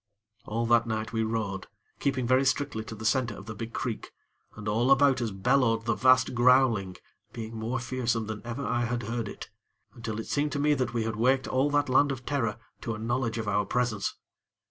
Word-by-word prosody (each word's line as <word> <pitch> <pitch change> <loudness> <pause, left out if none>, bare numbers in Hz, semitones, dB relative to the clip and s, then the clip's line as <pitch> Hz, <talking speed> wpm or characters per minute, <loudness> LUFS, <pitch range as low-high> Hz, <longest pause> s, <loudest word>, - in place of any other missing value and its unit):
All 115 +2 -1
that 120 0 +4
night 110 0 -3
we 110 - +1
rowed, 110 -4 -2 0.3
keeping 130 -3 0
very 130 +2 +4
strictly 135 -3 0
to 110 - -7
the 110 +1 -8
center 120 +2 +1
of 100 - -10
the 110 - -6
big 115 +2 -6
creek, 115 -2 -4 0.5
and 105 0 -8
all 115 +5 +2
about 135 -2 +5
us 115 - 0
bellowed 115 +3 +2
the 115 - +2
vast 130 0 +4
growling, 120 -6 +4 0.4
being 115 0 -6
more 115 +3 -2
fearsome 120 -2 -1
than 110 -1 -5
ever 120 +3 -4
I 120 0 0
had 120 0 -2
heard 115 0 -3
it, - - -9 0.4
until 115 -2 -5
it 110 - -5
seemed 145 +1 -1
to 145 - -1
me 150 +1 +3
that 130 -4 -1
we 115 - +1
had 110 -1 -3
waked 130 +3 +2
all 135 +3 +2
that 145 0 +2
land 140 +2 +4
of 130 -2 -6
terror 115 -8 -1 0.2
to 115 -2 -3
a - - -6
knowledge 115 +1 -1
of 110 -1 -3
our 105 0 +2
presence. 120 -5 -1
115 Hz, 210 wpm, -28 LUFS, 110-130 Hz, 0.5 s, about